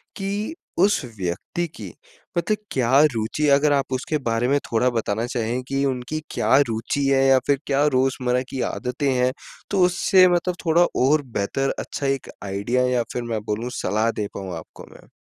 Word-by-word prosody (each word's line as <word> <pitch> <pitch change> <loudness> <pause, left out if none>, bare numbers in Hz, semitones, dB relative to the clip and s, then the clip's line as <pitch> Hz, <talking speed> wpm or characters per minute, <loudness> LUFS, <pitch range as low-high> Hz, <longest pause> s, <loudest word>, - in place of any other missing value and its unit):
कि 205 +9 -3 0.2
उस 200 +3 +4 0.2
व्यक्ति 95 - -3
की - - -8 0.5
मतलब 190 +6 +1
क्या 130 +1 +3
रूचि 115 +7 -1
अगर 145 +1 +3
आप 135 -1 0
उसके 150 +4 -1
बारे 115 +1 +1
में 140 - +3
थोड़ा 115 +2 +3
बताना 115 -2 -1
चाहें 120 0 -2
कि 135 0 -1
उनकी 130 +3 -2
क्या 135 - +3
रुचि 115 +5 -1
है? 135 -1 +3
या 135 -1 +6
फिर 140 -2 +2
क्या 140 +1 +2
रोज़मर्रा 130 -1 +1
की 130 - -4
आदतें 130 +3 -2
हैं? 125 0 +2 0.4
तो 195 -2 +1
उससे 185 +1 +4
मतलब 175 0 +1
थोड़ा 170 +1 +5 0.2
और 150 +2 +4 0.2
बेहतर 135 +7 0
अच्छा 140 - -5
एक 135 -1 -2
आइडिया 100 +6 0
या 125 -2 +1
फिर 125 - -3
मैं 110 - -1
बोलूँ 110 +3 -2
सलाह 110 +4 +1
दे 105 - -2
पाऊँ 95 -3 -5
आपको 80 - -11
मैं। - - -17
130 Hz, 180 wpm, -23 LUFS, 115-145 Hz, 0.5 s, या